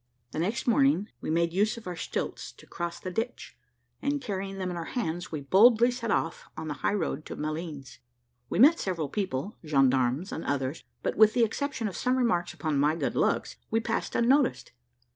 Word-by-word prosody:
The - - -4
next 205 +9 -1
morning 270 -4 +3
we - - -4
made 170 +1 +1
use 210 +4 +1
of 230 - -10
our 180 - -4
stilts - - -4
to - - -17
cross 170 0 -5
the 185 - -5
ditch, 225 +6 -4 0.5
and 285 +1 0
carrying 195 -5 -4
them 185 -1 -2
in - - -4
our 170 -1 -4
hands 175 -6 -2
we 155 -3 -3
boldly 225 - +6
set 230 -2 -4
off 165 -5 -1
on 160 - -5
the 150 - -2
high - - +1
road 160 -5 -2
to - - -6
Malines. 150 -5 -5 0.5
We - - -2
met 295 - +7
several 170 -6 -2
people, 190 0 -3
gendarmes, 135 +2 +2
and 160 - -4
others, 140 +1 -2 0.2
but - - -1
with 215 0 +7
the 240 - +4
exception 230 +1 -1
of 195 - -6
some 250 +1 +1
remarks 220 -9 +1
upon 155 -4 -1
my 150 +3 +3
good - - -1
looks - - 0
we 225 - +2
passed 225 0 -2
unnoticed. 260 +3 +2
185 Hz, 200 wpm, -28 LUFS, 155-230 Hz, 0.5 s, met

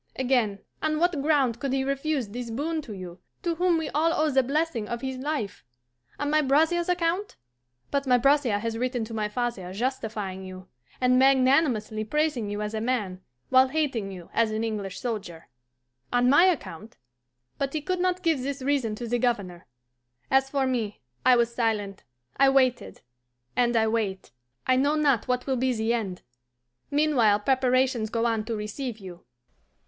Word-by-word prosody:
Again, 245 -6 +1 0.2
on 310 0 0
what 340 -3 +1
ground 275 -6 +2
could 270 0 -2
he 270 0 +1
refuse 275 -3 -1
this 240 +2 -6
boon 310 +7 -2
to 235 -7 -9
you, 180 -2 -9 0.2
to 340 -2 0
whom 350 0 +2
we 320 -1 -2
all 320 +3 +2
owe 310 -2 +1
the 265 -1 +4
blessing 275 -4 -1
of 235 +1 -4
his 265 -1 -4
life? 275 -8 -3 0.5
On 290 +1 -2
my 305 0 +4
brother's 320 +5 +2
account? 360 +3 0 0.6
But 280 -1 -1
my 250 -1 +5
brother 275 -4 +3
has 225 +2 -3
written 250 -2 -1
to 225 - -9
my 215 -1 -1
father 210 -5 -3
justifying 215 -5 -3
you, 185 0 -10 0.3
and 255 0 +4
magnanimously 260 -5 +3
praising 280 -3 0
you 205 +1 -3
as 210 +1 -4
a 220 - -2
man, 210 -7 -2 0.3
while 260 0 +6
hating 260 -9 -1
you 180 -3 -10
as 230 -1 +2
an 215 +1 -2
English 205 -4 -4
soldier. 205 - -5 0.6
On 245 0 +3
my 290 +7 +6
account? 230 - -2 0.6
But 275 -1 -1
he 310 - -1
could 365 +4 -2
not 365 0 0
give 320 -6 +2
this 275 0 -4
reason 265 -6 0
to 235 +2 -6
the 240 +1 0
Governor. 200 -8 -2 0.6
As 270 0 +3
for 275 -1 0
me, 235 -5 -2 0.2
I 255 - +6
was 235 -1 +1
silent, 210 -5 -2 0.3
I 275 0 +6
waited 260 -2 +1 0.5
and 240 -1 +2
I 220 0 +3
wait; 215 -4 -2 0.3
I 255 - +3
know 285 +3 +2
not 280 -7 +2
what 250 0 0
will 265 -2 0
be 255 +1 +1
the 225 0 0
end. 200 -6 -3 0.7
Meanwhile 265 -9 +3
preparations 255 -2 +2
go 230 +1 -1
on 225 -2 0
to 230 0 -3
receive 215 +3 -5
you." 185 -4 -11
250 Hz, 175 wpm, -26 LUFS, 220-280 Hz, 0.7 s, while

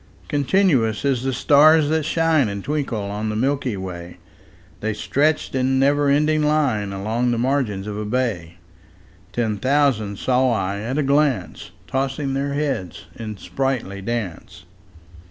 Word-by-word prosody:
Continuous 140 - +1
as 135 -4 +1
the 135 +1 -1
stars 150 +3 +5
that 160 -1 0
shine 160 -6 +2
And 100 -1 -5
twinkle 140 -7 -2
on 105 +2 -3
the 105 - -3
milky 130 -2 0
way, 90 -2 -7 0.6
The 110 0 -2
stretched 150 +7 0
in 130 0 +1
never 140 +1 +3
ending 150 +2 +2
line 140 -10 +1
Along 110 +5 -1
the 120 - 0
margin 120 -6 -1
of 105 - -4
a 105 - -3
bay: 105 -8 -2 0.7
Ten 110 -3 -1
thousand 130 -5 +1
saw 130 +2 +2
I 100 -1 -2
at 120 +6 -3
a 150 - +2
glance, 140 - 0 0.2
Tossing 135 +3 -2
their 140 +1 -2
heads 135 - -3
in 110 -2 -6
sprightly 125 -6 -3
dance. 100 -5 -5
130 Hz, 145 wpm, -21 LUFS, 105-145 Hz, 0.7 s, stars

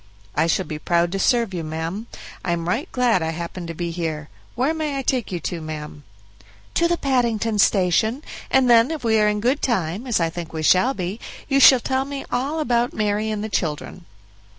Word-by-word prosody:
"I 160 +2 +2
shall 180 +3 +1
be 155 -2 -6
proud 170 +1 +1
to 195 - -2
serve 230 -2 +2
you, 170 -2 -3
ma'am; 165 +8 -4 0.4
I 175 - 0
am 170 -1 -3
right 240 - -2
glad 245 -7 +2
I 160 - -1
happened 170 +2 -5
to 165 - -6
be 170 +1 -3
here. 160 -3 -4 0.3
Where 260 +6 +1
may 305 -3 -2
I 270 - -2
take 250 -5 -1
you 175 - -2
to, 170 -2 -4
ma'am?" 150 -2 -7 0.7
"To 340 - +3
the 345 0 0
Paddington 230 -6 0
Station, 210 - +2 0.3
and 265 -1 +4
then 235 0 +6
if 320 -4 -4
we 220 -1 +3
are 210 - +4
in 210 0 +1
good 255 +7 +1
time, 205 -1 -1
as 235 -6 +1
I 165 -1 0
think 170 -1 -7
we 160 -1 -3
shall 240 - +4
be, 185 +4 -4 0.3
you 275 -1 +2
shall 265 -2 +8
tell 265 +2 -1
me 280 -1 -6
all 275 +6 -1
about 245 -5 +1
Mary 210 0 0
and 215 -1 -3
the - - -2
children." 170 -2 -3
210 Hz, 215 wpm, -22 LUFS, 170-250 Hz, 0.7 s, shall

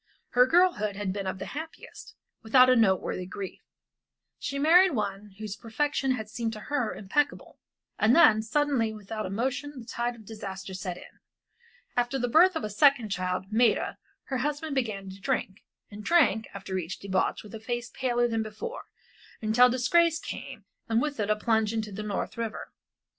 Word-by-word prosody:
Her 250 +1 +5
girlhood 335 - +3
had 195 -2 -2
been 200 -1 -4
of 190 - -3
the - - -6
happiest, 320 +2 -9 0.3
without 255 +3 +6
a - - +5
noteworthy 190 -4 +1
grief. 195 0 -7 0.8
She 280 - -3
married 345 +5 +6
one 200 -2 -4
whose 215 -2 -5
perfection 265 +4 -1
had 220 -4 -5
seemed 225 +1 -3
to 215 - -7
her 255 0 -2
impeccable, 275 +9 -2 0.4
and 225 +4 +5
then 220 -10 +7
suddenly 255 -1 +1
without 215 0 -5
a - - -6
monition 260 +7 -2
the 230 - -10
tide 240 +1 -2
of 220 -2 -15
disaster 195 -3 -7
set 185 -1 -5
in. - - -14 0.8
After 245 +2 +1
the 245 -1 0
birth 345 +8 +5
of 320 - -2
a 215 - -2
second 260 0 +4
child, 185 +1 -2
Maida, 230 -1 +2 0.2
her 265 - -3
husband 295 +3 -2
began 215 -7 -2
to 195 +1 -12
drink, 215 -4 -2 0.3
and 210 +1 -9
drank, 245 - +3
after 190 -1 -4
each 175 +1 -5
debauch 190 -1 -1
with 210 - -13
a 225 - -6
face 240 +2 -4
paler 240 -2 +1
than 225 -1 -1
before, 220 - -6 0.5
until 230 +3 +5
disgrace 325 +7 +3
came - - -8 0.2
and 225 0 +3
with 290 0 -2
it 205 -1 -1
a 215 - +4
plunge 220 0 +1
into 220 -2 -3
the 200 +2 -5
North 210 +1 -4
River. 225 -1 -4
225 Hz, 180 wpm, -28 LUFS, 205-265 Hz, 0.8 s, then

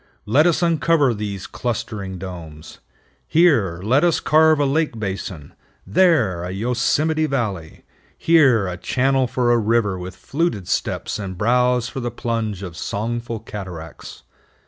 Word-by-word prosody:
Let 140 +10 +4
us 175 0 +1
uncover 165 -5 +2
these 100 -3 -5
clustering 110 -5 -4
domes. 85 -4 -9 0.5
Here 120 - +3
let 130 - +3
us 175 -2 +3
carve 155 0 +4
a 145 - +2
lake 145 -2 0
basin; 95 -7 -5 0.3
there, 110 - +2
a 90 - -4
Yosemite 125 +10 0
Valley; 105 - -3 0.3
here, 135 -11 +4
a 90 -1 -4
channel 130 +5 +1
for 120 0 +1
a 120 - +4
river 105 -4 +1
with 90 0 -7
fluted 135 - -2
steps - - -2
and 95 -3 -6
brows 125 +3 +2
for 135 - -6
the 120 -1 -2
plunge 110 -4 -3
of 90 -3 -7
songful 115 +4 -4
cataracts. 90 -7 -9
115 Hz, 140 wpm, -21 LUFS, 95-135 Hz, 0.5 s, Let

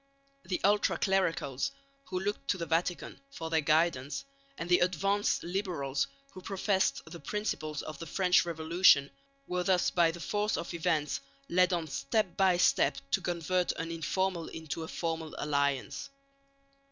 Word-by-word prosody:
The 185 - -2
ultra 205 +1 +3
clericals, 165 -9 0 0.4
who 185 -7 -3
looked 205 +2 -3
to 185 - +1
the 170 - -3
Vatican 170 +2 -1
for 165 -11 -6
their 160 -1 +3
guidance, 150 - +1 0.3
and 165 - -4
the 180 0 +5
advanced 195 +3 +1
liberals 170 -7 -1 0.2
who 185 - -10
professed 195 0 0
the 170 - -9
principles 155 -9 -3
of 155 -2 -7
the 165 - -6
French 180 +2 +3
Revolution 160 -3 +4 0.3
were 180 -5 -1
thus 180 0 +2
by 170 -2 +4
the 170 +1 -6
force 210 +4 0
of 170 - -5
events 160 -4 0 0.3
led 180 +1 +4
on 170 -2 0
step 170 +7 -1
by 190 -2 +4
step 145 -5 +3
to 190 - +2
convert 175 +1 0
an 165 +1 -4
informal 170 +1 -1
into 160 -1 -6
a 160 - -5
formal 160 -2 -3
alliance. 140 - -1
170 Hz, 155 wpm, -31 LUFS, 160-185 Hz, 0.4 s, the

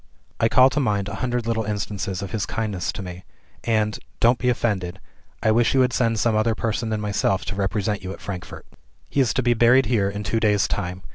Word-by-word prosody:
I 115 - +3
call 130 +2 +6
to 150 - 0
mind 105 -7 0
a 100 - -5
hundred 125 -2 -1
little 115 -1 0
instances 100 -2 -3
of 100 - -6
his 110 -3 -2
kindness 105 -6 -2
to 100 - -6
me 90 0 -8 0.4
and 110 -2 0 0.2
(don't 120 +2 +4
be 125 - +1
offended) 95 -7 -1 0.4
I 110 - +4
wish 120 +3 +3
you 130 - +5
had 125 -1 +2
sent 115 -2 +1
some 110 0 +2
other 110 +1 +2
person 115 0 -2
than 110 -1 -1
myself 100 -3 0
to 100 - -4
represent 100 +1 -1
you 95 - -5
at - - -8
Frankfort. 90 -4 -7 0.5
"He - - 0
is 125 - +2
to 130 - +1
be 120 0 +3
buried 120 +3 +5
here, 105 -3 +1
in 100 +1 -5
two 110 +3 0
days' 105 -3 +2
time. 90 -1 -4
110 Hz, 225 wpm, -23 LUFS, 100-115 Hz, 0.5 s, call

